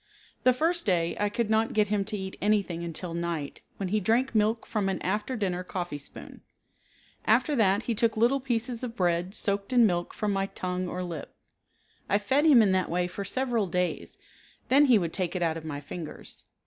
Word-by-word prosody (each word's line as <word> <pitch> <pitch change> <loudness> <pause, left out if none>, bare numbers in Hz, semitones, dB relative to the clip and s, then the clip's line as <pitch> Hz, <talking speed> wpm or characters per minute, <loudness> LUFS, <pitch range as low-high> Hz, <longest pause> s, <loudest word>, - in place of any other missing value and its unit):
The 255 - +7
first 330 +3 0
day 170 -3 +1
I 205 0 +1
could 220 +1 -1
not 220 +1 +2
get 210 -2 +2
him 205 -1 +1
to 215 0 -3
eat 190 -1 -6
anything 200 -5 +1
until 170 +1 -5
night, 170 -4 -3 0.2
when 195 -2 -3
he 215 +3 +2
drank 230 +6 +1
milk 220 +1 +1
from 205 -3 -1
an 190 - -2
after 210 +7 -1
dinner 185 -5 -1
coffee 175 -5 -4
spoon. 140 - -10 0.8
After 300 - +3
that 205 -2 +3
he 235 - -1
took 225 0 +1
little 240 +5 +3
pieces 240 -2 -2
of 240 -2 -5
bread 175 0 0
soaked 200 +1 -1
in 245 -2 +6
milk 175 -4 -1
from 210 -1 -1
my 195 0 0
tongue 185 -1 -3
or 180 +1 -4
lip. 170 -5 -7 0.7
I 200 - +4
fed 265 +9 +2
him 255 -7 +7
in 200 - +3
that 185 -1 +1
way 180 +1 0
for 185 +3 -5
several 240 -1 -1
days, 180 0 -2 0.5
then 280 +3 +6
he 250 -5 +6
would 170 -4 -2
take 185 -2 -2
it 180 - 0
out 160 -1 +1
of 160 -1 -7
my 145 -2 -4
fingers. 155 +2 -8
200 Hz, 205 wpm, -28 LUFS, 180-225 Hz, 0.8 s, The